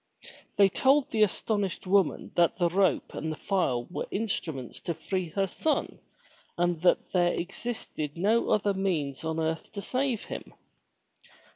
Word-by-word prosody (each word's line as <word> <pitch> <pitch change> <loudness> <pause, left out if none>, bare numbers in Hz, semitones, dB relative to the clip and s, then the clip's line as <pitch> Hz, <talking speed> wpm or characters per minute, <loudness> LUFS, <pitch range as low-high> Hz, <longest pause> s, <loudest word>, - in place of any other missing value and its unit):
They 200 - +7
told 270 +8 +3
the 220 - +1
astonished 205 -2 0
woman 190 -3 +2
that 170 -1 +3
the 175 -2 +2
rope 185 -2 +1
and 160 - -3
the - - -3
file 150 -11 0
were - - -3
instruments 160 - -3
to 170 - -3
free 185 +1 -3
her 195 +5 0
son 300 - -1 0.6
and 175 -2 +1
that 180 - +3
there 175 -1 +3
existed 175 -6 -4
no 215 +6 +2
other 205 -1 +2
means 165 -8 -1
on 160 0 -2
earth 160 0 -2
to 200 - -4
save 255 -3 -1
him. - - -7
185 Hz, 150 wpm, -28 LUFS, 160-205 Hz, 0.6 s, They